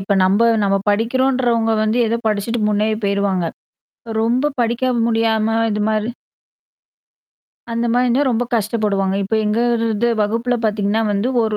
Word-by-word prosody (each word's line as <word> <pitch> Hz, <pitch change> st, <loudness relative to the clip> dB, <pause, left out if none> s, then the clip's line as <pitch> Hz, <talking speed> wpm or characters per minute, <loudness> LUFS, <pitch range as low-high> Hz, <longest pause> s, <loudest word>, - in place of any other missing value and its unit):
இப்ப 195 Hz, +1 st, -1 dB
நம்ப 200 Hz, +5 st, +2 dB, 0.2 s
நம்ம 195 Hz, 0 st, +2 dB
படிக்கிறோன்றவங்க 235 Hz, 0 st, +1 dB
வந்து 215 Hz, +3 st, 0 dB
ஏதோ 230 Hz, +1 st, 0 dB
படிச்சுட்டு 215 Hz, +2 st, -1 dB
முன்னேறி 215 Hz, +1 st, 0 dB
போயிருவாங்க. 200 Hz, -3 st, 0 dB, 0.8 s
ரொம்ப 255 Hz, +6 st, +1 dB
படிக்காம 240 Hz, +1 st, 0 dB
முடியாம 225 Hz, -1 st, +1 dB, 0.2 s
இது 210 Hz, 0 st, -1 dB
மாரி 215 Hz, +1 st, -1 dB, 1.6 s
அந்தமாரி 235 Hz, +2 st, +1 dB
இருந்தா 250 Hz, +4 st, +2 dB
ரொம்ப 240 Hz, +1 st, 0 dB
கஷ்டப்படுவாங்க. 205 Hz, -3 st, 0 dB
இப்ப 220 Hz, -, -2 dB
எங்க 210 Hz, +2 st, 0 dB, 0.6 s
வகுப்புல 230 Hz, +4 st, -1 dB
பாத்தீங்கன்னா 210 Hz, +1 st, 0 dB
வந்து 205 Hz, +5 st, 0 dB
ஒரு 215 Hz, -1 st, -1 dB
225 Hz, 125 wpm, -18 LUFS, 205-235 Hz, 1.6 s, நம்ப